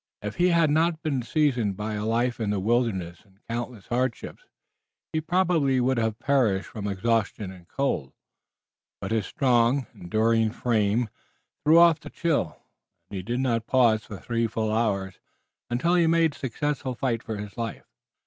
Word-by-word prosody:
If 105 - -5
he 180 - +4
had 170 -4 +3
not 160 +1 +1
been 140 -5 0
seasoned 120 - 0
by 105 +1 -3
a 105 0 -3
life 120 +2 0
in 110 -3 -1
the 105 -1 0
wilderness 95 -6 0
and 95 -2 -27
countless 120 -3 -5
hardships 125 - -3 0.7
he 155 - 0
probably 165 -6 +2
would 130 0 +1
have 110 -1 -1
perished 115 -9 +1
from 105 -2 -5
exhaustion 105 -1 -1
and 90 -2 -14
cold, 135 - -2 0.9
but 100 - -5
his 110 -4 0
strong, 125 0 +2
enduring 110 +4 +1
frame 115 -1 +1 0.6
threw 155 +2 +6
off 170 -2 +6
the - - -10
chill, 150 - -1 0.5
and 100 - -4
he - - -3
did 120 +7 -2
not 115 -3 0
pause 115 -4 +3
for 105 - -8
three 115 +2 -1
full 110 0 -2
hours 100 -4 -1 0.5
until 125 +9 +1
he 180 - +4
had 165 - +3
made 165 -2 +3
a - - -15
successful 135 0 -2
fight 120 -3 -1
for 110 - -5
his 105 0 -7
life. 115 -3 -5
115 Hz, 170 wpm, -26 LUFS, 105-140 Hz, 0.9 s, threw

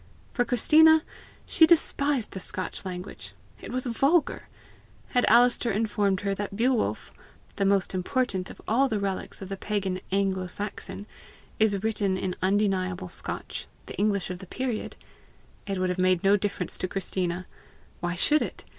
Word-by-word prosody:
For 245 - +2
Christina, 315 +6 +5 0.4
she 320 - +5
despised 285 -7 +2
the 190 - -6
Scotch 185 +1 -3
language: 180 - -6 0.3
it - - -8
was 255 +1 -2
vulgar! 275 +7 +1 0.6
Had 245 -2 +2
Alister 240 +1 +5
informed 205 -2 0
her 200 -1 0
that 200 0 -4
Beowulf, 245 +2 0 0.4
"the 200 - +1
most 195 -1 +2
important 190 0 -1
of - - -11
all 265 +5 +3
the 215 - -1
relics 195 0 -4
of 190 - -8
the 195 - -4
Pagan 190 -3 -2
Anglo 190 -1 0
Saxon, 205 +1 -6 0.5
is 205 -2 +2
written 205 -4 0
in 185 -1 -2
undeniable 185 -2 0
Scotch, - - -5 0.2
the - - -8
English 200 -3 0
of 180 - -6
the 190 - -11
period," 245 +1 -3 0.7
it 195 -1 -2
would 185 0 0
have 180 +1 -2
made 185 0 +2
no 195 +1 +5
difference 200 -3 -2
to 185 - -2
Christina! 185 -1 -2 0.5
Why 175 0 -2
should 300 +12 +3
it? - - -5
200 Hz, 155 wpm, -27 LUFS, 185-230 Hz, 0.7 s, Christina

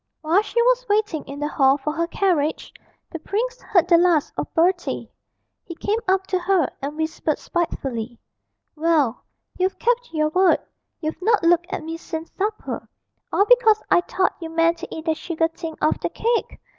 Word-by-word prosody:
While 325 +6 +3
she 450 +2 -2
was - - +2
waiting 415 -7 +1
in 280 +1 -8
the 295 - -1
hall 270 -2 +3
for 300 +2 -3
her 335 +1 -1
carriage, 335 -5 0 0.4
the 330 - -5
prince 480 +9 -3
heard 355 -4 +2
the 340 -2 +6
last 340 -4 +2
of - - -4
Bertie; 350 +2 +1 0.5
he 340 - -9
came 425 +6 -1
up 380 0 +2
to 370 -1 0
her 360 -3 +2
and 290 +2 -5
whispered 315 -1 -1
spitefully, 250 -9 -3 0.6
'Well, 305 -6 +1 0.4
you've 375 +1 0
kept 485 0 0
your 305 -1 +1
word, 365 +2 +4 0.4
you've 315 +2 -4
not 430 0 +2
looked 345 +1 +3
at - - -3
me 325 +1 -5
since 325 -1 -7
supper, 420 +2 -3 0.4
all 400 - +3
because 450 -3 +5
I - - +6
thought 370 +1 0
you 325 - -5
meant 330 +1 +2
to - - -6
eat 320 - -7
that 320 -2 0
sugar 325 0 -1
thing 330 -1 -7
off 310 - +2
the - - -2
cake! 465 +1 -1
335 Hz, 180 wpm, -22 LUFS, 315-390 Hz, 0.6 s, the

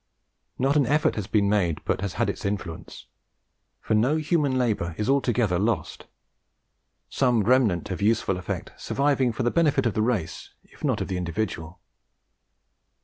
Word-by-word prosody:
Not 135 +3 +1
an 140 -4 +3
effort 150 +4 +2
has 105 -3 -4
been 105 -2 +2
made 95 -6 0
but - - -1
has 100 -2 -3
had - - 0
its - - -4
influence. 100 -4 -5 0.8
For - - -1
no 120 +8 +3
human 150 -3 +1
labour 105 -9 -1
is 105 - -2
altogether 120 -9 +1
lost; 110 +3 -2 1.0
some 125 -5 +2
remnant 110 -7 +2
of 95 - -4
useful 105 -3 +1
effect 90 - -5
surviving 140 -3 +1
for 115 +3 -3
the 120 - +1
benefit 150 -6 +2
of 115 - +1
the 110 - 0
race, 110 -7 -2
if - - -20
not - - 0
of - - -2
the 95 - -3
individual. 85 -1 -4
110 Hz, 160 wpm, -25 LUFS, 95-130 Hz, 1.0 s, an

